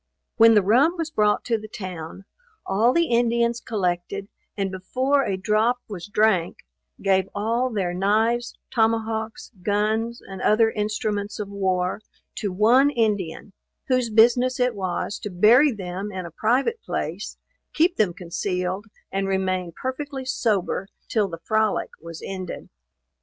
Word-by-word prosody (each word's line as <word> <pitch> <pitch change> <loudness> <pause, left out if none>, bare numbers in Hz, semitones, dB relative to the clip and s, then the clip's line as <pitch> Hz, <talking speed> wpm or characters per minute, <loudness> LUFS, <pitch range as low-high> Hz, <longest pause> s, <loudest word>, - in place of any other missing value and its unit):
When 225 0 +7
the 210 - +5
rum 270 - +4
was 325 -1 -3
brought 210 -6 +2
to 230 -2 0
the 215 - -9
town, 185 -3 -7 0.4
all 215 +6 +3
the 335 +4 +3
Indians 235 0 +2
collected, 195 -1 -2 0.3
and 195 -1 -1
before 260 +9 0
a 195 -5 -1
drop 215 +5 +2
was 190 -5 -7
drank, 205 - +1 0.4
gave 190 -1 +2
all 230 +5 0
their 190 -6 -1
knives, 220 +6 +1
tomahawks, 220 -1 -1
guns, 215 +4 0
and 195 -1 -9
other 225 +1 +4
instruments 210 -1 -2
of 210 -2 -5
war, 190 -1 -1 0.4
to 205 - -2
one 235 +9 +5
Indian, 210 - -1 0.4
whose 255 -2 +2
business 245 +4 +4
it 250 -1 +2
was 190 0 -3
to 210 - -5
bury 230 +10 +5
them 195 -1 -5
in 185 -2 -5
a 170 - -8
private 260 - +1
place, - - -4 0.3
keep 345 +3 +2
them 210 -5 +3
concealed, 180 +2 -3 0.2
and 195 0 -1
remain 185 -2 -1
perfectly 265 - -5
sober 205 -7 0 0.2
till 215 -3 +2
the 170 -3 -7
frolic 220 -1 +1
was 165 0 -9
ended. 185 -2 -6
210 Hz, 140 wpm, -24 LUFS, 190-235 Hz, 0.4 s, When